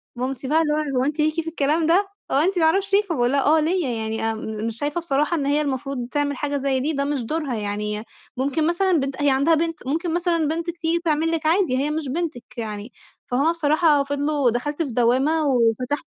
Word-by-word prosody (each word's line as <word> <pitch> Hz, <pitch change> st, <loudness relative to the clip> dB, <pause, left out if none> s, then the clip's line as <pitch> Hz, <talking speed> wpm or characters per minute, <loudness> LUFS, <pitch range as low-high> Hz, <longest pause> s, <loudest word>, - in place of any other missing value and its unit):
مامتي 260 Hz, +1 st, -4 dB
بقى 315 Hz, +4 st, +3 dB
اللي 300 Hz, -2 st, +1 dB
هو 295 Hz, -4 st, -1 dB
هو -, -, +2 dB
أنتِ 295 Hz, +2 st, -2 dB
ليكِ 305 Hz, 0 st, +2 dB
في 325 Hz, -, -12 dB
الكلام 315 Hz, 0 st, +1 dB
ده، 365 Hz, +5 st, +3 dB, 0.2 s
هو -, -, +1 dB
أنتِ 355 Hz, +5 st, +2 dB
ما 320 Hz, -, +4 dB
اعرفش 390 Hz, +5 st, +1 dB
إيه، 400 Hz, -, +6 dB
فباقول 290 Hz, -12 st, 0 dB
لها 280 Hz, 0 st, +2 dB
آه 315 Hz, +2 st, +5 dB
ليّا، 325 Hz, -1 st, 0 dB
يعني 225 Hz, -1 st, -3 dB
آمم 220 Hz, 0 st, -5 dB
مش 230 Hz, -1 st, -4 dB
شايفة 295 Hz, +4 st, -2 dB
بصراحة 300 Hz, +1 st, 0 dB
إن 285 Hz, -, -1 dB
هي 290 Hz, +2 st, +2 dB
المفروض 270 Hz, -3 st, -3 dB
تعمل 285 Hz, -1 st, -1 dB
حاجة 290 Hz, +1 st, -1 dB
زي 270 Hz, -1 st, 0 dB
دي، 295 Hz, +5 st, -1 dB
ده 280 Hz, -1 st, -1 dB
مش 285 Hz, -2 st, -1 dB
دورها 295 Hz, 0 st, -2 dB
يعني 210 Hz, 0 st, -3 dB, 0.3 s
ممكن 280 Hz, +4 st, 0 dB
مثلًا 370 Hz, +3 st, +1 dB
بنت 270 Hz, 0 st, -2 dB
أ 290 Hz, -, -7 dB
هي 290 Hz, -, +4 dB
عندها 280 Hz, +5 st, +3 dB
بنت، 325 Hz, -4 st, -2 dB
ممكن 325 Hz, +4 st, -1 dB
مثلًا 340 Hz, -2 st, +1 dB
بنتِك 335 Hz, +2 st, -3 dB
تيجي 340 Hz, 0 st, 0 dB
تعمل 320 Hz, +1 st, +1 dB
لِك 325 Hz, -2 st, -2 dB
عادي، 325 Hz, -5 st, +2 dB
هي 285 Hz, +3 st, 0 dB
مش 310 Hz, -1 st, -3 dB
بنتِك 310 Hz, -4 st, -3 dB
يعني، 215 Hz, 0 st, -5 dB, 0.4 s
فهُم 280 Hz, +6 st, +3 dB
بصراحة 310 Hz, -2 st, +3 dB
فِضلوا 285 Hz, -1 st, 0 dB
دخلت 290 Hz, +7 st, -2 dB
في 290 Hz, -, -5 dB
دوّامة، 260 Hz, +7 st, +2 dB
وفتحت 250 Hz, +3 st, +1 dB
290 Hz, 225 wpm, -23 LUFS, 260-325 Hz, 0.4 s, إيه